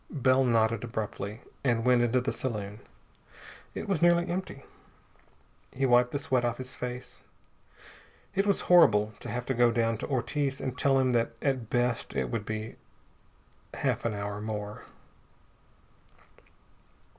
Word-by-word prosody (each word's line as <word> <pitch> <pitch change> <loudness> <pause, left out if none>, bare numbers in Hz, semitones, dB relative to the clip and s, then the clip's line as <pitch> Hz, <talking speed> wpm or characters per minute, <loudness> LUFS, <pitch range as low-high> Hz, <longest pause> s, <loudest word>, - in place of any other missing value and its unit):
Bell 130 -2 +3
nodded 115 -2 +2
abruptly 110 -2 -5 0.2
and 120 -3 +1
went 125 -1 +5
into 120 +1 +2
the 125 - -2
saloon. 105 -4 -4 1.0
It - - -5
was 195 -5 0
nearly 175 0 +4
empty. 175 -6 -4 1.1
He 135 +1 -1
wiped 125 -1 +5
the 145 - -2
sweat 135 -4 0
off 120 -1 -1
his 130 0 -6
face. 125 0 -7 1.1
It 195 +1 +1
was 200 - +2
horrible 110 -12 +5
to 120 - -6
have 125 +2 -3
to 135 - -1
go 120 -1 +4
down 115 -1 0
to - - -4
Ortiz 135 +1 -1
and 130 -1 -3
tell 135 +1 +2
him 130 -1 +2
that 115 -1 +1
at 130 -6 -1
best 120 -1 0
it - - -1
would 115 -3 -2
be 110 0 -5 1.0
half - - -1
an 115 -3 -1
hour 100 0 -4
more.... 105 -1 -5
120 Hz, 145 wpm, -29 LUFS, 115-135 Hz, 1.1 s, went